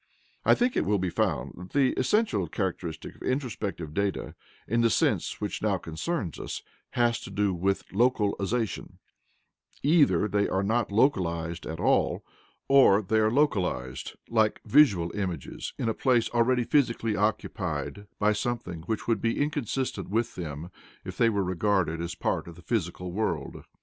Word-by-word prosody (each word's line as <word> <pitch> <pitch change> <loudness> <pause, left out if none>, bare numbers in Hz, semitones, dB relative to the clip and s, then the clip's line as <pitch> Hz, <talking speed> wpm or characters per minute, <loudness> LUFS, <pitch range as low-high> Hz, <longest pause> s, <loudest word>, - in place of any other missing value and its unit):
I - - +5
think 245 +1 +1
it - - +2
will 105 0 +3
be 95 -2 -1
found - - -1
that 90 +1 -10
the 135 -3 +3
essential 130 - +1
characteristic 85 -3 -4
of - - -23
introspective 105 - -3
data, 100 +1 -1 0.3
in 115 +2 +2
the 115 - +4
sense - - +1
which - - -3
now - - +1
concerns 85 - -4
us, - - -5 0.3
has 120 -1 +2
to - - -9
do 100 0 0
with 95 +3 0
LOCALIZATION: 110 0 0 0.9
either 140 - +4
they 100 0 +1
are 95 +1 0
not 110 +1 0
localized 85 - +1
at 80 0 -5
all, - - +2 0.4
or 130 -7 +6
they 110 +4 +1
are 110 0 +3
localized, 90 - 0
like 110 -2 +1
visual 100 - +4
images, 90 -8 -4
in 120 - -2
a 115 - +1
place 120 -3 +2
already 120 +1 +3
physically 115 -5 +1
occupied 105 0 -2
by 105 0 +3
something 105 -6 -3
which 110 -1 -2
would 115 -4 +1
be 115 0 0
inconsistent 140 -3 -2
with 115 +3 0
them 80 0 -6 0.3
if - - -6
they 115 - +4
were 100 -3 0
regarded 90 -2 0
as 85 0 -4
part - - -1
of 85 - -9
the 90 - -15
physical 90 -4 -2
world. 110 +5 -3
105 Hz, 160 wpm, -27 LUFS, 90-120 Hz, 0.9 s, or